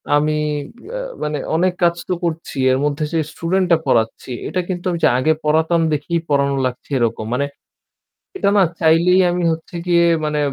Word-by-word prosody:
আমি 150 Hz, +1 st, +2 dB, 0.6 s
আ -, -, -3 dB, 0.2 s
মানে 150 Hz, 0 st, -2 dB, 0.2 s
অনেক 180 Hz, +2 st, +2 dB
কাজ 170 Hz, 0 st, +4 dB
তো -, -, 0 dB
করছি। 165 Hz, -3 st, -3 dB
এর 130 Hz, -, +2 dB
মধ্যে, 150 Hz, +1 st, -1 dB
যে 165 Hz, -, +2 dB
student 185 Hz, +4 st, 0 dB
টা 170 Hz, -, +6 dB
পড়াচ্ছি 115 Hz, +1 st, 0 dB, 0.2 s
এটা 185 Hz, -, -2 dB
কিন্তু 175 Hz, -1 st, -4 dB
আমি 170 Hz, -, -1 dB
ওইযে -, -, +3 dB
আগে 155 Hz, +5 st, +3 dB
পড়াতাম 160 Hz, +2 st, +2 dB
দেখেই 160 Hz, +3 st, -1 dB
পড়ানো 140 Hz, -1 st, +2 dB
লাগছে 125 Hz, -1 st, -5 dB
এরকম। 115 Hz, -2 st, -1 dB
মানে 140 Hz, +3 st, 0 dB, 0.9 s
এটা 290 Hz, -, +2 dB
না 195 Hz, -, +6 dB, 0.2 s
চাইলেই 170 Hz, +3 st, +4 dB
আমি 175 Hz, 0 st, -1 dB
হচ্ছে 160 Hz, +2 st, -6 dB
গিয়ে 170 Hz, -1 st, +4 dB, 0.2 s
মানে 150 Hz, 0 st, -1 dB
160 Hz, 175 wpm, -19 LUFS, 145-175 Hz, 0.9 s, টা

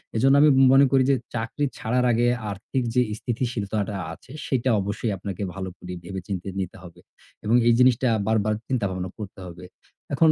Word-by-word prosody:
এজন্য 135 Hz, +5 st, +4 dB
আমি 150 Hz, -, +7 dB, 0.2 s
মনে 135 Hz, +1 st, +7 dB
করি 135 Hz, -1 st, +4 dB
যে, 135 Hz, -, +4 dB, 0.2 s
চাকরি 115 Hz, +6 st, -2 dB
ছাড়ার 125 Hz, +3 st, 0 dB
আগে 120 Hz, +1 st, +2 dB, 0.2 s
আর্থিক 125 Hz, +6 st, -3 dB
যে 125 Hz, -, +5 dB, 0.2 s
স্থিতিশীলতাটা 110 Hz, -4 st, -2 dB, 0.2 s
আছে 125 Hz, +9 st, -15 dB, 0.2 s
সেটা 130 Hz, -1 st, 0 dB
অবশ্যই 105 Hz, +3 st, -2 dB
আপনাকে 95 Hz, +1 st, -6 dB
ভালো 95 Hz, -1 st, -5 dB
করে 90 Hz, 0 st, -8 dB
ভেবেচিন্তে 95 Hz, 0 st, -5 dB
নিতে 95 Hz, 0 st, -4 dB
হবে। 85 Hz, -2 st, -13 dB, 0.5 s
এবং 110 Hz, +3 st, +3 dB
এই 120 Hz, -, +6 dB
জিনিসটা 125 Hz, 0 st, +4 dB, 0.2 s
বারবার 110 Hz, -1 st, +2 dB
চিন্তাভাবনা 95 Hz, -8 st, -2 dB
করতে 100 Hz, -2 st, -8 dB
হবে। 90 Hz, 0 st, -10 dB, 0.5 s
এখন 160 Hz, +1 st, +5 dB
110 Hz, 165 wpm, -24 LUFS, 95-125 Hz, 0.5 s, আমি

